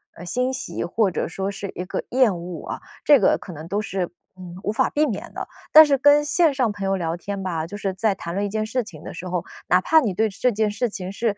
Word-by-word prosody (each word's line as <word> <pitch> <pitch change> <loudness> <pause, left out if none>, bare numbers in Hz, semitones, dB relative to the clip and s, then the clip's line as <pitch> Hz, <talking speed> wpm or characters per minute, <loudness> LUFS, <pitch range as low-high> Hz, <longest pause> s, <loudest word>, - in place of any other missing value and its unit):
呃， 175 - -10
欣 250 +8 0
喜， 265 +3 -4
或 200 +3 +1
者 - - -2
说 190 +3 -3
是 200 -1 -6
一 180 - -5
个 185 - -3
厌 250 -6 +3
恶 170 0 -7
啊， - - -5 0.2
这 290 - +8
个 - - +4
可 180 - -9
能 155 +2 -9
都 205 +2 0
是， 190 -4 -3 0.3
嗯， 180 -1 -9
无 210 - -1
法 - - +2
避 300 +1 +2
免 220 -8 -5
的。 - - -5 0.2
但 315 0 +10
是 285 -2 +2
跟 290 +2 +5
线 315 0 +3
上 255 -4 +1
朋 200 -1 -7
友 195 0 +1
聊 165 -2 -2
天 200 +2 -5
吧， 165 -4 -2
就 205 +5 -7
是 195 -2 -2
在 205 +2 +1
谈 170 -2 -6
论 200 +1 0
一 205 - -2
件 215 +1 -1
事 245 +2 -1
情 170 -8 -12
的 - - -7
时 180 - -8
候， 180 -1 -2 0.2
哪 180 - +5
怕 315 - +4
你 215 -9 -1
对 220 +4 +2
这 230 +5 0
件 215 -1 +1
事 230 +4 -1
情 185 -3 -6
是 210 -1 -1
200 Hz, 290 characters per minute, -23 LUFS, 180-245 Hz, 0.3 s, 但